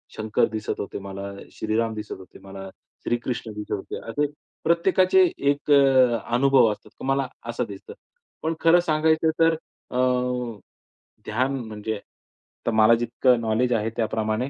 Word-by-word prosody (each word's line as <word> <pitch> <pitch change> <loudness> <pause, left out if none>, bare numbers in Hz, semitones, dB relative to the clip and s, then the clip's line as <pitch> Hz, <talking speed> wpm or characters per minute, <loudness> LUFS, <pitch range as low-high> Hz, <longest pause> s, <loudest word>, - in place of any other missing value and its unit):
शंकर 110 0 +1
दिसत 110 -1 -4
होते 100 - -5
मला, 100 0 -7 0.2
श्रीराम 110 +1 -1
दिसत 105 0 -6
होते 95 - -14
मला, 95 0 -9 0.3
श्रीकृष्ण 120 -1 -2
दिसत 105 0 -7
होते. 95 - -5
असे 145 +6 0 0.4
प्रत्येकाचे 185 +2 +4 0.2
एक 145 +1 -1
अ, 130 -4 +5 0.2
अनुभव 130 -3 +5
असतात. 105 - -9
तर - - -6
मला 135 0 +1 0.2
असं 120 +1 -1
दिसतं. 100 -1 -9 0.5
पण 160 +1 0
खरं 165 +1 +5
सांगायचं 160 -1 +2
तर 165 0 +5 0.4
अ, 125 - -3 1.3
ध्यान 130 +5 0
म्हणजे? 110 0 -4
आता 105 +2 -9
मला 110 +1 +6
जितकं 120 +1 +2
नॉलेज 115 +3 +1
आहे 110 -1 0
त्याप्रमाणे 110 +2 -1
120 Hz, 140 wpm, -24 LUFS, 110-140 Hz, 1.3 s, मला